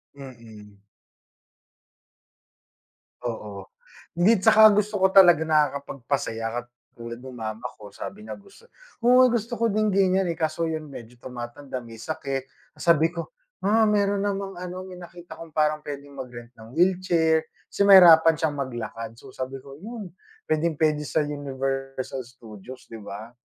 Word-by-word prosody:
Mm. 110 -7 -13 2.4
Oo, 105 -5 -6 0.5
hindi 195 +3 +4
tsaka 215 0 +7
gusto 210 0 0
ko 190 0 +4
talaga 175 -5 +7
nakakapagpasaya 140 -6 -1
katulad 115 -1 -11
ng 130 -1 -10
mama 110 0 -6
ko. 105 -2 -13
Sabi 210 - -8
niya, - - -6 0.7
"Uy, 250 +1 +6
gusto 235 0 -2
ko 230 - +2
din 215 -1 +1
ganyan." 190 0 +3
Eh, 165 - -6
kaso 160 +1 -1
yun 155 -2 -4
medyo 120 -3 -11
tumatanda, 125 +2 -7
may 115 -1 -12
sakit. 135 -4 -4 0.2
Sabi 165 0 +2
ko, 170 - -5 0.3
"Ah, 220 +3 +3
meron 205 -1 +1
namang 195 -2 -3
ano, 180 +1 -6
may 180 - -10
nakita 175 -2 -12
kong 165 -2 -11
parang 150 0 +1
pwedeng 140 -1 -8
mag-rent 120 -2 -9
ng 115 +2 -13
wheelchair." 170 -2 +2 0.2
Kasi - - -4
mahirapan 165 -4 +8
siyang 150 -3 -1
maglakad. 115 -3 -5
So, 130 +2 -14
sabi 130 +1 -5
ko, 135 +1 -13
"Yun 210 -1 -8 0.4
pwedeng-pwede 155 -1 +1
sa 155 - 0
Universal 135 -2 -4
Studios," 120 0 -12
'di 115 -2 -9
ba? 110 +4 -9
150 Hz, 140 wpm, -25 LUFS, 125-185 Hz, 2.4 s, mahirapan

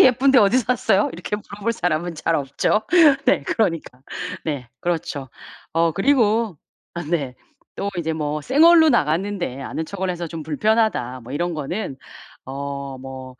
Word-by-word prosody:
예쁜데 260 +1 +6
어디서 225 +3 +4
샀어요?" 210 -3 +2
이렇게 175 +5 -4
물어볼 210 +2 -4
사람은 175 -5 -1
잘 160 +2 -1
없죠. 145 +9 0 0.4
네, 255 - +3
그러니까. 165 - -1 0.4
네, 140 -6 -3
그렇죠. 160 -6 -3 0.4
어 165 0 +2
그리고 220 - +2 0.4
아 170 - -4
네. 145 -5 -2 0.4
또 200 - -2
이제 160 -1 -1
뭐 150 -1 -2
'생얼로 320 - +6
나갔는데 175 - 0
아는 150 +4 -4
척을 190 +2 -4
해서 175 -1 -3
좀 165 -1 -6
불편하다.' 160 - 0
뭐 125 - -9
이런 175 +4 -1
거는 155 +1 -4 0.5
어 140 0 -5
뭐 130 0 -9
170 Hz, 290 characters per minute, -22 LUFS, 145-210 Hz, 0.5 s, 예쁜데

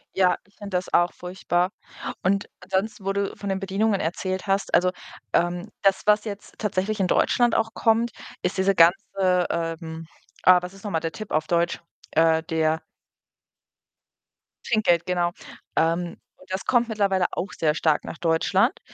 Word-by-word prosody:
Ja, 180 -2 +3
ich 200 - -29
finde 200 -2 -7
das 180 - -5
auch 175 0 +3
furchtbar 180 0 -1 0.5
und 200 +2 +1
ansonsten, 190 +3 -2
wo 195 - 0
du 200 0 -2
von 200 - -6
den 195 0 0
Bedienungen 195 +2 0
erzählt 185 +4 -2
hast, 195 0 0
also, 180 0 +4 0.4
ähm, 175 +3 0
das, 195 -1 +3
was 210 +1 +4
jetzt 205 -1 -7
tatsächlich 210 0 -1
in 185 - +2
Deutschland 240 +6 +3
auch 225 0 -1
kommt, 230 +1 +2 0.3
ist 180 +2 -1
diese 190 +1 +2
ganze, 180 +1 +3
ähm 165 -1 -4 0.4
ah, 180 -1 +7
was 180 +2 -7
ist 195 - -15
noch 205 - -3
mal 160 - +1
der 165 0 -2
Tip 215 -2 -8
auf 155 +1 +1
Deutsch? 170 0 +1 0.3
Äh, 160 0 +4
der 160 0 0 1.8
Trinkgeld, 175 -7 +2
genau. 175 -1 0 0.4
Ähm, 170 +1 +1 0.2
und 185 0 -10
das 190 - -3
kommt 240 -1 +2
mittlerweile 200 -4 +1
auch 190 - -4
sehr 155 -2 +1
stark 155 -2 +2
nach - - -7
Deutschland. 165 0 +2
185 Hz, 165 wpm, -24 LUFS, 170-200 Hz, 1.8 s, ah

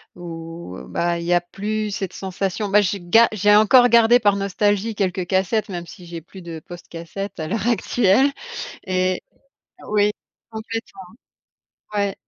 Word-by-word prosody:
où 165 - -8
ben, 170 0 0
il 170 - -5
y 175 - +2
a 175 - +4
plus 210 +4 -3
cette 195 -2 -4
sensation 195 +2 -3
bah 205 +1 +5
j'ai 200 0 -1
ga 225 +7 +5
j'ai 205 0 +4
encore 245 +4 +6
gardé 235 +1 +6
par 205 -3 +3
nostalgie 205 +2 0
quelques 185 -3 -1
cassettes, 190 +4 0
même 175 -2 -5
si 180 - -12
j'ai 170 -1 -7
plus 185 +2 -13
de 165 -2 -7
poste 175 +3 -12
cassette 185 +4 -7
à 155 - -3
l'heure 210 +4 -2
actuelle 240 +2 +3 0.6
et 185 0 0 0.7
oui 210 0 +3 0.4
complètement. 220 -2 -6 0.9
Ouais 200 -1 0
195 Hz, 155 wpm, -21 LUFS, 175-215 Hz, 0.9 s, encore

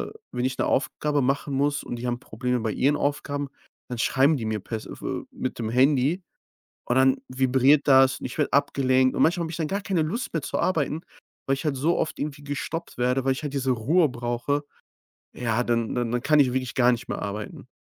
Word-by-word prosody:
äh - - -15
wenn 125 +1 -2
ich 130 0 -2
'ne - - +1
Aufgabe 145 +2 0
machen 135 +2 0
muss 145 +1 +1
und 120 - -5
die 125 +1 -4
haben 120 0 -1
Probleme 125 -1 -2
bei 110 -1 -1
ihren 145 +3 +2
Aufgaben, 145 -1 -2 0.4
dann 125 - -4
schreiben 135 +5 +3
die 115 - -4
mir 110 -1 -1
per 110 +3 -4
s - - -10
f - - -10
äh, - - -3
mit 130 - -4
dem 110 -1 -2
Handy 140 +7 +3 0.6
und 120 - 0
dann 130 0 +5
vibriert 130 +3 +3
das 135 0 +5
und - - -4
ich 125 - -8
werde 150 - 0
abgelenkt. 130 -2 +2
Und - - +3
manchmal 170 +1 +3
habe 160 - -5
ich - - -5
dann 155 -2 -1
gar 200 +1 -1
keine 180 -5 0
Lust 205 +11 -3
mehr 160 - 0
zu - - -3
arbeiten, 160 -3 0 0.5
weil 135 - +2
ich 135 - -6
halt 150 -3 0
so 160 +6 +1
oft 160 - -2
irgendwie 145 0 -5
gestoppt 145 +1 -5
werde, 125 +2 +1
weil 135 - +3
ich 135 - -5
halt 145 -1 -4
diese 135 -1 0
Ruhe 150 +8 +3
brauche. 120 +4 -2 0.7
Ja, 120 0 0
dann 115 -2 0
dann 120 -2 -1
dann 120 0 0
kann 150 +1 +4
ich 130 -3 +4
wirklich 130 -1 -2
gar 125 -1 +5
nicht 120 - -3
mehr - - -3
arbeiten. 105 +1 -6
135 Hz, 230 wpm, -25 LUFS, 125-145 Hz, 0.7 s, dann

